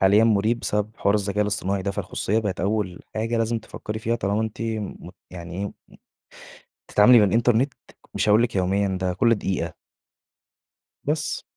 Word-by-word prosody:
حاليًا 100 +4 +5
مُريب 110 +2 +2
بسبب 105 0 -1
حوار 100 - +2
الذكاء 105 0 +1
الاصطناعي 100 -2 -1
ده، 100 - -1
فالخصوصيَّة 100 +2 -1
بقت 105 -6 -2
أول 100 -2 -1
حاجة 115 +2 -1
لازم 115 +1 0
تفكري 110 -1 -7
فيها، 115 +1 -1
طالما 105 -1 0
أنتِ 110 0 -4
م 110 -3 -4 0.2
يعني 85 -1 -8
إيه، 100 - -2
م - - -8 1.2
بتتعاملي 120 +4 +7
بالإنترنت، 115 +6 +3 0.4
مش - - 0
هأقول 105 +3 +5
لِك 120 -2 -2
يوميًا 95 +1 +1
ده 90 -1 0
كُلّ 115 +5 +3
دقيقة. 90 -4 -3 1.3
بس. 150 +1 -1
105 Hz, 155 wpm, -24 LUFS, 100-115 Hz, 1.3 s, بتتعاملي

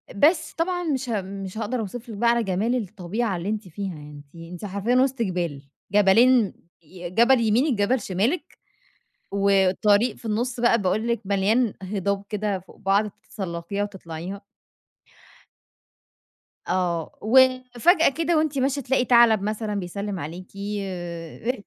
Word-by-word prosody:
بس، 315 - +3
طبعًا 355 +1 -1
مش 270 -6 -2
ه 210 -4 0
مش 195 +1 -7
هاقدر 230 +3 -2
أوصف 230 +3 -6
لكِ 210 - -7
بقى 235 +2 +3
على 235 -1 +2
جمال 205 +6 0
الطبيعة 205 -1 -2
اللي 180 +4 -4
أنتِ 215 -3 -3
فيها، 190 0 -5
يعني 150 0 -11
أنتِ 140 - -26 0.2
أنتِ 180 +3 -7
حرفيًا 200 +5 -1
وِسط 260 -1 +2
جِبَال، 175 -8 -2 0.3
جَبلين 215 +3 +5 0.3
ي 175 +2 -9
جَبَل 235 +6 +4
يمينك، 240 +6 +2
جَبَل 230 +5 +2
شمالك 205 - -2 0.7
وطريق 200 +3 +3
في - - -19
النُص 235 +3 -2
بقى 235 -1 +4
باقول 215 +5 0
لكِ 235 -2 0
مليان 205 +4 +1
هِضاب 200 +1 -2
كده 210 -2 -2
فوق 180 - -17
بعض 200 +1 +1
تتسلّقيها 190 0 -5
وتطلعيها. 190 -1 -6 2.3
آه، 175 -3 -1
وفجأة 255 - +4
كده 330 +3 0
وأنتِ 305 -3 +1
ماشي 270 +1 0
تلاقي 265 0 +1
تَعلَب 235 -4 +5
مثلًا 215 0 -2
بيسلّم 200 +1 -4
عليكِ 175 +5 -7
أ 195 +2 -4
210 Hz, 140 wpm, -24 LUFS, 190-240 Hz, 2.3 s, جَبلين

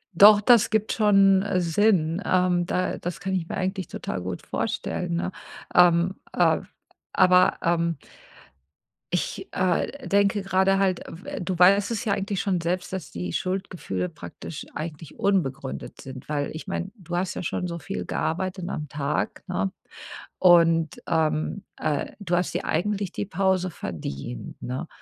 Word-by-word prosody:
Doch, 205 +2 +9
das 235 0 +5
gibt 220 0 +1
schon, 195 -3 +5
äh, 200 -3 0
Sinn. 175 -1 +2
Ähm, 180 -1 +2
da 185 0 -1
das 175 0 -5
kann 190 -1 -3
ich 175 -3 -1
mir - - -4
eigentlich 185 -1 -2
total 90 - -5
gut 90 0 -5
vorstellen, 175 -2 -2
ne? 180 +2 -1 0.4
Ähm, 175 +1 +5 0.2
ah, - - +3 0.5
aber, 185 -1 +5
ähm 170 -1 +1 1.2
ich, - - -2
äh, 185 +9 0
denke 200 0 +2
grade 195 0 +2
halt, 190 -2 +1
äh, - - -8
w - - -5
du 180 0 -2
weißt 200 +4 +5
es 230 0 -2
ja 220 - 0
eigentlich 200 -1 -2
schon 185 -3 0
selbst, 180 +2 -2
dass 190 -3 -5
die 85 0 -5
Schuldgefühle 180 - -3
praktisch - - -9
eigentlich 155 -1 -6
unbegründet 140 -9 -1
sind, 130 -1 -9
weil 145 -1 -2
ich 160 +5 -8
meine, 195 0 -3
du 175 -3 -6
hast 185 +1 -1
ja - - -4
schon 180 0 -2
so 170 -1 -5
viel 145 - -5
gearbeitet 185 +2 -2
am 150 -6 -4
Tag, 145 0 -2
ne? 95 +1 -1 0.7
Und, 165 -3 +4
ähm, 160 +4 0
äh, 150 -2 -2
du 180 -4 -2
hast 180 0 +1
dir - - -2
eigentlich 195 +3 -1
die - - -3
Pause 190 -1 +1
verdient, 70 - -6
ne? 130 +7 -4
180 Hz, 160 wpm, -25 LUFS, 165-195 Hz, 1.2 s, Doch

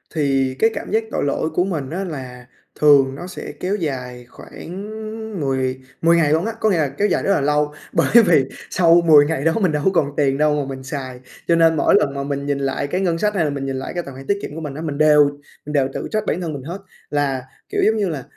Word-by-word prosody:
Thì 135 -3 +1
cái 225 - +4
cảm - - -6
giác 225 +1 +2
tội - - -1
lỗi 145 +3 -1
của 175 +3 0
mình 160 -8 -3
á, 180 +6 -3
là 130 -8 -7 0.3
thường 140 -3 +5
nó 175 - -7
sẽ 185 - -7
kéo 190 +3 -1
dài 125 -8 -4
khoảng 190 +11 -9 0.5
mười 130 -2 -1 0.2
mười 170 +1 +4
ngày 155 -3 +3
luôn 160 +4 +1
á. 225 - -1
Có 220 - +2
nghĩa 190 - +2
là 155 -3 +2
kéo 205 +9 0
dài - - 0
rất 200 - +1
là 150 - +1
lâu 150 +1 +1 0.2
bởi - - +2 0.2
vì 160 -7 +4 0.2
sau 170 -1 +4
10 150 -3 +7
ngày 150 -2 -2
đó 165 - +4
mình 185 - +2
đâu 150 -1 -1
có 190 - +4
còn 145 -4 0
tiền 135 -1 +2
đâu 150 0 +2
mà 145 - -1
mình 130 - -11
xài. 130 -2 -6 0.3
Cho 170 - +4
nên 165 -1 +4
mỗi - - +3
lần 140 - -1
mà 140 0 -3
mình 140 0 -3
nhìn 145 -1 0
lại 135 +1 -2
cái 180 +6 -2
ngân 170 -3 +1
sách 210 +3 0
hay 175 - +2
là 150 - 0
mình 140 -1 -4
nhìn 135 0 -3
lại - - -6
cái 175 - -3
tài 140 - -9
khoản 135 +1 -11
tiết 200 - +1
kiệm 150 - -7
của 165 - -6
mình 150 -3 -5
á, 155 - -6
mình 150 -3 -4
đều 150 -1 +6 0.4
mình 150 - -6
đều 135 -3 +2
tự - - -4
trách 215 -1 -1
bản 180 - -1
thân 165 -3 -3
mình 140 -3 -7
hết 175 +7 -6 0.3
là, 140 -3 -1 0.3
kiểu, - - -1
giống 220 - +3
như 200 -3 0
là 145 -6 -4
150 Hz, 270 wpm, -20 LUFS, 135-170 Hz, 0.5 s, 10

